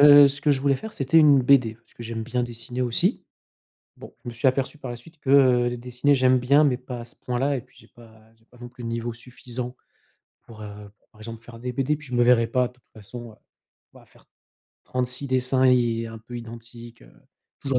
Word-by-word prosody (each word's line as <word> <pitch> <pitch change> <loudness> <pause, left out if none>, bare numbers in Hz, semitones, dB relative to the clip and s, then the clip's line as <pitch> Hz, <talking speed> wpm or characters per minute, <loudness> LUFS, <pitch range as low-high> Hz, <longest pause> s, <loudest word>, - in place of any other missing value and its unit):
heu, 145 -1 +9
ce 140 +1 -4
que 150 - +2
je 135 - -1
voulais 140 -1 +2
faire, 220 +6 -8
c'était 135 +4 +2
une 145 -4 +6
BD 125 -4 +4
parce 115 +1 -22
que 120 - -10
j'aime 115 0 -4
bien 125 +2 -2
dessiner 120 +1 -6
aussi. 145 - 0 0.7
Bon, - - -12
je 120 - -5
me 120 - -9
suis 115 +3 0
aperçu 135 +3 0
par 130 -4 -7
la 120 - -7
suite 160 +7 -18
que, 135 - -7 0.4
heu, 120 - -4
dessiner 125 +4 0
j'aime 130 0 +4
bien 140 +5 +4
mais 130 -4 +2
pas 125 -1 -8
à 120 - -9
ce - - -16
point 125 -1 -4
là 140 +1 +1
et 125 - -5
puis - - -26
j'ai - - -19
pas 110 -1 -19
j'ai 115 0 -32
pas 125 - -21
non 120 - -9
plus 125 0 -12
le 115 - -4
niveau 115 +1 -3
suffisant 125 +1 -8 0.7
pour, 110 -2 -14
heu, 105 0 -10 0.2
par 110 - -21
exemple 115 0 -8
faire 115 -1 -12
des 125 +1 -4
BD 135 +4 -1
et - - -4
puis 150 -1 -14
je 125 - -5
me 120 - +3
verrais 120 -2 +4
pas 125 +1 +1
de - - -20
toute 125 - -31
façon, 115 +2 -10
heu, 105 - -20 0.6
bah, - - -17
faire - - -24 0.6
36 125 +2 -2
dessins 130 0 +1
et 120 -3 +3
un 115 0 -9
peu 120 +2 -10
identiques, 115 - -11
heu, - - -18 0.5
toujours 135 -2 0
125 Hz, 245 wpm, -24 LUFS, 115-130 Hz, 0.7 s, heu